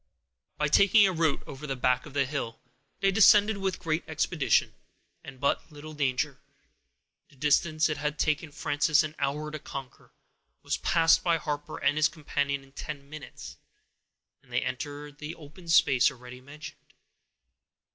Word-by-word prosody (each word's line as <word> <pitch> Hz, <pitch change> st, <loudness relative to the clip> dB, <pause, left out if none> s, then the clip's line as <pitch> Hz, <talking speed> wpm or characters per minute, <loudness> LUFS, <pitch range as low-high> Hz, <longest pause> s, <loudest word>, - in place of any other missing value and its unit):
By 150 Hz, -, +1 dB
taking 200 Hz, +7 st, +6 dB
a 190 Hz, -, +2 dB
route 160 Hz, -3 st, 0 dB
over 140 Hz, +2 st, -8 dB
the 135 Hz, -, -2 dB
back 125 Hz, +1 st, +1 dB
of 145 Hz, -, -13 dB
the 140 Hz, -1 st, +2 dB
hill, 130 Hz, -4 st, -4 dB, 0.4 s
they 195 Hz, 0 st, +3 dB
descended 210 Hz, +1 st, +6 dB
with 190 Hz, -2 st, -1 dB
great 165 Hz, -1 st, -2 dB
expedition, 155 Hz, -1 st, +1 dB, 0.5 s
and 135 Hz, -1 st, -11 dB
but 140 Hz, +3 st, -1 dB
little 155 Hz, +1 st, -10 dB
danger. 140 Hz, -1 st, -1 dB, 0.9 s
The -, -, -22 dB
distance 155 Hz, +3 st, +2 dB
it 150 Hz, -, -2 dB
had 150 Hz, +1 st, -3 dB
taken 155 Hz, 0 st, 0 dB
Frances 145 Hz, +2 st, +2 dB
an 155 Hz, 0 st, -5 dB
hour 150 Hz, +2 st, -2 dB
to 155 Hz, -, -6 dB
conquer, 135 Hz, -2 st, -9 dB, 0.5 s
was -, -, -1 dB
passed 165 Hz, -1 st, +3 dB
by 170 Hz, -2 st, +2 dB
Harper 150 Hz, -1 st, -5 dB
and 145 Hz, -, +1 dB
his 155 Hz, +1 st, +4 dB
companion 140 Hz, -3 st, -2 dB
in 135 Hz, -, -20 dB
ten 140 Hz, 0 st, -8 dB
minutes, 155 Hz, -1 st, -10 dB, 0.8 s
and -, -, -24 dB
they -, -, 0 dB
entered 145 Hz, +3 st, -6 dB
the 150 Hz, +3 st, -6 dB
open 160 Hz, +3 st, -14 dB
space 140 Hz, -6 st, +5 dB
already 125 Hz, 0 st, -12 dB
mentioned. 150 Hz, +4 st, -12 dB
150 Hz, 155 wpm, -28 LUFS, 140-160 Hz, 0.9 s, taking